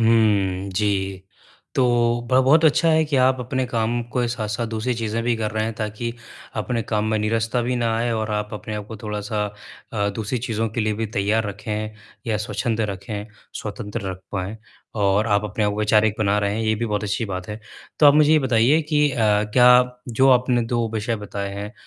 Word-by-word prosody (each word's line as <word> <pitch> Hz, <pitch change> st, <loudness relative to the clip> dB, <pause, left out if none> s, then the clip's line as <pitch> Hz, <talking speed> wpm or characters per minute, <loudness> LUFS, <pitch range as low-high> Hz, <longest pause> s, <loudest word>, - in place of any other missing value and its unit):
हुँ, 100 Hz, -4 st, +2 dB
जी। 95 Hz, -1 st, -1 dB, 0.5 s
तो 130 Hz, -, +3 dB, 0.5 s
ब 130 Hz, 0 st, +5 dB
बहुत 155 Hz, +5 st, +5 dB
अच्छा 160 Hz, +2 st, +4 dB
है 160 Hz, 0 st, +4 dB
कि 150 Hz, -2 st, -1 dB
आप 130 Hz, 0 st, +3 dB
अपने 130 Hz, +1 st, -1 dB
काम 120 Hz, 0 st, -1 dB, 0.2 s
के 125 Hz, -1 st, +2 dB
साथ-साथ 115 Hz, -1 st, -3 dB
दूसरी 115 Hz, +2 st, -2 dB
चीजें 115 Hz, 0 st, -2 dB
भी 120 Hz, 0 st, +1 dB
कर 110 Hz, -1 st, -2 dB
रहे 110 Hz, 0 st, -1 dB
हैं 115 Hz, -, -3 dB
ताकि 110 Hz, +2 st, -4 dB, 0.4 s
अपने 120 Hz, -2 st, -1 dB
काम 105 Hz, -1 st, -1 dB
में 110 Hz, -, +1 dB
निरस्त 110 Hz, +2 st, -1 dB
भी 125 Hz, 0 st, 0 dB
ना 115 Hz, -2 st, 0 dB
आए 120 Hz, +1 st, 0 dB
और 110 Hz, -1 st, -2 dB
आप 105 Hz, 0 st, -2 dB
अपने 105 Hz, +1 st, -6 dB
आप 105 Hz, -1 st, -5 dB
को 110 Hz, -, -8 dB
थोड़ा-सा 105 Hz, 0 st, -2 dB, 0.5 s
अ, 100 Hz, -2 st, 0 dB
दूसरी 110 Hz, +4 st, -2 dB
चीज़ों 115 Hz, -1 st, -2 dB
के 110 Hz, +2 st, -3 dB
लिए 110 Hz, 0 st, +1 dB
भी 110 Hz, +1 st, -2 dB
तैयार 105 Hz, +2 st, 0 dB
रखें 105 Hz, +1 st, -4 dB, 0.4 s
या 110 Hz, -2 st, +1 dB
स्वच्छंद 105 Hz, +2 st, -2 dB
रखें, 100 Hz, 0 st, -4 dB, 0.3 s
स्वतंत्र 105 Hz, -2 st, -5 dB
रख 95 Hz, 0 st, -8 dB
पाएँ 100 Hz, +2 st, -3 dB, 0.5 s
और 100 Hz, +2 st, +3 dB
आप 105 Hz, -1 st, +2 dB
अपने 105 Hz, +1 st, -1 dB
आप 105 Hz, -, +2 dB
को 105 Hz, -, -5 dB
वैचारिक 105 Hz, 0 st, +3 dB
बना 105 Hz, -1 st, +2 dB
रहे 100 Hz, 0 st, 0 dB
हैं, 110 Hz, -, -2 dB
ये 110 Hz, 0 st, +1 dB
भी 115 Hz, +2 st, -2 dB
बहुत 105 Hz, -1 st, -2 dB
अच्छी 105 Hz, +3 st, -1 dB
बात 95 Hz, -2 st, -5 dB
है। 105 Hz, +1 st, -6 dB, 0.4 s
तो 150 Hz, -, +8 dB
आप 145 Hz, -, +7 dB
मुझे 150 Hz, 0 st, +5 dB
ये 155 Hz, -, +6 dB
बताइए 130 Hz, +2 st, +3 dB
कि 150 Hz, 0 st, +4 dB
अ, 120 Hz, +2 st, +5 dB, 0.2 s
जो 130 Hz, +3 st, +3 dB
आपने 125 Hz, -1 st, +3 dB
2 115 Hz, 0 st, -1 dB
विषय 110 Hz, +2 st, -1 dB
बताए 100 Hz, -1 st, -5 dB
हैं, 100 Hz, +2 st, -6 dB
110 Hz, 205 wpm, -22 LUFS, 105-120 Hz, 0.5 s, तो